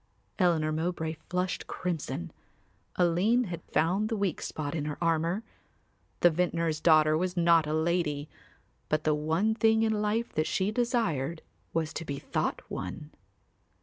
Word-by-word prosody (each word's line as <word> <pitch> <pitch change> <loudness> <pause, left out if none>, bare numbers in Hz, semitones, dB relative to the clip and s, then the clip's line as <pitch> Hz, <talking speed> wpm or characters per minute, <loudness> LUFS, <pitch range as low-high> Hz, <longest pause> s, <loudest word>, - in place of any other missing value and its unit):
Eleanor 165 -4 +3
Mowbray 160 0 -2 0.2
flushed 180 +1 -2
crimson; 155 - -3 0.6
Aline 185 +8 +3
had 175 -6 -5
found 185 +7 +2
the 225 - -1
weak 195 -5 -1
spot 145 -2 -4
in 155 -3 -2
her 150 -1 -4
armour. 170 +4 +1 0.8
The 175 - +6
vintner's 165 -2 0
daughter 155 -2 +5
was 180 +2 -1
not 170 -2 +4
a 150 - -1
lady, 160 -3 0 0.6
but 155 0 +1
the 155 - +3
one 160 +8 +1
thing 220 0 +3
in 220 -1 +2
life 215 +3 -1
that 155 0 0
she 190 +2 0
desired 195 - 0 0.3
was 160 -1 -1
to - - -4
be 140 -3 -4
thought - - -2
one. 150 +12 -6
170 Hz, 150 wpm, -29 LUFS, 155-185 Hz, 0.8 s, The